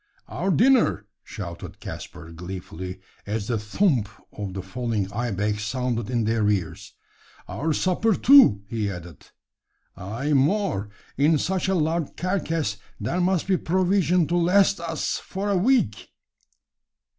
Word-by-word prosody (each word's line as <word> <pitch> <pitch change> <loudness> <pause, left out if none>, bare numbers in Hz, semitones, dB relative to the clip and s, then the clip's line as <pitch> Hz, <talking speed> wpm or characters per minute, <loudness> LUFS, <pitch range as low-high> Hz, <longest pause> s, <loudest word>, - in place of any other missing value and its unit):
"Our 190 - -2
dinner!" 230 - +3 0.2
shouted 85 -5 -8
Caspar, 85 -2 -9
gleefully, 90 +1 -7 0.3
as 105 0 -2
the 115 0 -1
"thump" 115 - +1 0.2
of 100 -3 -6
the 95 - -4
falling 105 -1 -3
ibex 105 -2 -1
sounded 120 -1 -2
in 120 -2 0
their 110 -1 +1
ears. 95 -6 -3 0.5
"Our 160 +3 -2
supper, 185 +7 +1
too," 260 - +6
he 110 -2 -2
added. 90 -4 -9 0.7
"Ay, 115 +10 -3
more! 140 - +1 0.3
In 150 +3 +4
such 185 +5 -1
a 190 - +1
large 160 -1 -1
carcass 165 - -1 0.2
there 170 - -1
must 180 -1 +1
be 190 -1 +2
provision 180 0 +2
to 175 - +1
last 185 +2 +3
us 165 -2 -2
for 200 +2 -4
a - - +2
week!" 195 - +1
125 Hz, 135 wpm, -24 LUFS, -, 0.7 s, too